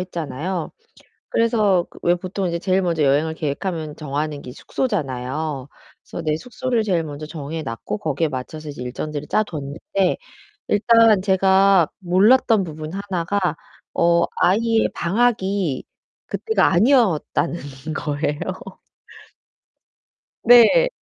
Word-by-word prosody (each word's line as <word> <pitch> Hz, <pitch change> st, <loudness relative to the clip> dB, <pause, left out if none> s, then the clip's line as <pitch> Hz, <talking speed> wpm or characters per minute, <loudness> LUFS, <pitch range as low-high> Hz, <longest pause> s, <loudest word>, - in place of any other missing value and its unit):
했잖아요. 170 Hz, -1 st, -4 dB, 0.6 s
그래서 215 Hz, -6 st, +2 dB, 0.2 s
왜 175 Hz, -, +3 dB
보통 185 Hz, +1 st, -3 dB
이제 170 Hz, 0 st, -2 dB
제일 185 Hz, +2 st, +1 dB
먼저 170 Hz, -3 st, 0 dB
여행을 145 Hz, +3 st, +2 dB
계획하면 155 Hz, +1 st, -4 dB
정하는 150 Hz, 0 st, -3 dB
게 125 Hz, -, -9 dB
숙소잖아요. 140 Hz, -, -3 dB, 0.3 s
그래서 170 Hz, -, -7 dB
내 155 Hz, -1 st, +1 dB
숙소를 245 Hz, +4 st, -2 dB
제일 175 Hz, -6 st, 0 dB
먼저 150 Hz, 0 st, -7 dB
정해 155 Hz, 0 st, -6 dB
놨고 115 Hz, -5 st, -5 dB
거기에 155 Hz, +3 st, -1 dB
맞춰서 150 Hz, +3 st, -6 dB
이제 140 Hz, -3 st, -8 dB
일정들을 145 Hz, +4 st, -5 dB
짜 215 Hz, -, +2 dB
뒀는데, 155 Hz, +4 st, -2 dB, 0.5 s
일단 225 Hz, 0 st, +5 dB
제가 190 Hz, -2 st, +4 dB
몰랐던 205 Hz, +4 st, +4 dB
부분 155 Hz, -1 st, -7 dB
하나가 195 Hz, -1 st, -2 dB, 0.5 s
어 170 Hz, 0 st, +3 dB, 0.2 s
아이의 225 Hz, +4 st, +3 dB
방학이 195 Hz, -, 0 dB, 0.4 s
그때가 445 Hz, -, +1 dB
아니었다는 195 Hz, -, +2 dB, 0.4 s
거예요. 150 Hz, -1 st, -2 dB, 2.0 s
네. 245 Hz, -, +7 dB
170 Hz, 270 characters per minute, -21 LUFS, 150-200 Hz, 2.0 s, 네